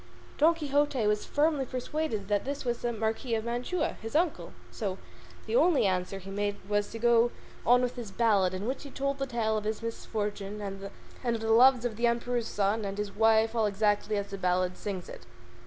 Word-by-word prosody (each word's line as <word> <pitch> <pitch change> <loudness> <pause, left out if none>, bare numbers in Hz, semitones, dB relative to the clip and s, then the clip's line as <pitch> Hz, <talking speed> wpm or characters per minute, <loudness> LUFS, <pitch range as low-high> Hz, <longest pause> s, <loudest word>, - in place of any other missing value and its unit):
Don 325 +3 +5
Quixote 290 -5 +1
was 210 0 +1
firmly 295 -1 +2
persuaded 255 -4 -3
that 205 -1 +1
this 280 0 -4
was 240 -1 -1
the 240 - 0
Marquis 225 +2 -1
of 220 0 -2
Mantua, 245 +9 -2
his 225 +5 -6
uncle, 335 +1 +1 0.2
so 195 -5 -3 0.5
the - - -2
only 350 - +4
answer 185 0 0
he 195 0 -9
made 205 0 -1
was 205 0 0
to - - -7
go 235 0 +4 0.4
on 245 +1 +6
with 250 0 -2
his 235 -4 -5
ballad, 195 -4 +2
in 190 +2 -4
which 260 +4 -2
he 285 - -9
told 275 +1 -2
the 275 - -1
tale 225 -3 0
of 210 - -3
his 215 +1 -3
misfortune, 210 -2 -4
and 195 -1 -6 0.5
of 225 - -5
the 225 0 0
loves 250 +1 +6
of 225 -3 -2
the 240 +1 +3
Emperor's 235 0 0
son 205 +2 0
and 200 0 -4
his 205 -1 -4
wife 220 +1 +4
all 225 -2 +2
exactly 210 +1 +1
as 200 0 -4
the 195 - -5
ballad 180 0 +1
sings 195 -4 -5
it. - - -11
225 Hz, 205 wpm, -29 LUFS, 205-250 Hz, 0.5 s, on